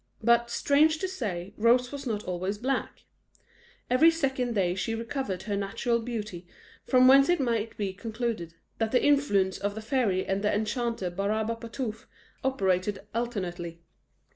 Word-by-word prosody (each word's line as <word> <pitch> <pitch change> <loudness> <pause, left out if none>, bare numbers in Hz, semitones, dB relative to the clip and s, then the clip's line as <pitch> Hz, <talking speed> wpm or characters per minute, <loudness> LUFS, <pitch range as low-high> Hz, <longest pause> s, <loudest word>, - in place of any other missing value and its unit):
But, 235 +1 +4
strange 305 +6 +3
to 375 - -2
say, 205 - -4
Rose 245 +3 +3
was 280 -1 -6
not 210 -3 -2
always 185 +3 -3
black; 260 +5 -2 0.8
every 255 +7 +6
second 265 -7 -1
day 180 -3 +2
she 195 +5 -2
recovered 230 -5 -3
her 205 -1 -2
natural 225 +4 0
beauty, 215 -7 -5 0.4
from 255 -1 +5
whence 275 +2 +7
it 350 -1 +3
might 230 -4 -1
be 200 -2 -2
concluded, 220 -5 -4 0.2
that 225 -1 0
the 250 - +3
influence 205 -10 +2
of 205 +1 -2
the - - -4
fairy 215 -6 0
and 195 +1 -1
the 210 - +1
Enchanter 220 -2 -1
Barabapatapouf 220 +4 -3 0.4
operated 195 -6 0
alternately. 180 -8 -4
225 Hz, 145 wpm, -28 LUFS, 195-250 Hz, 0.8 s, whence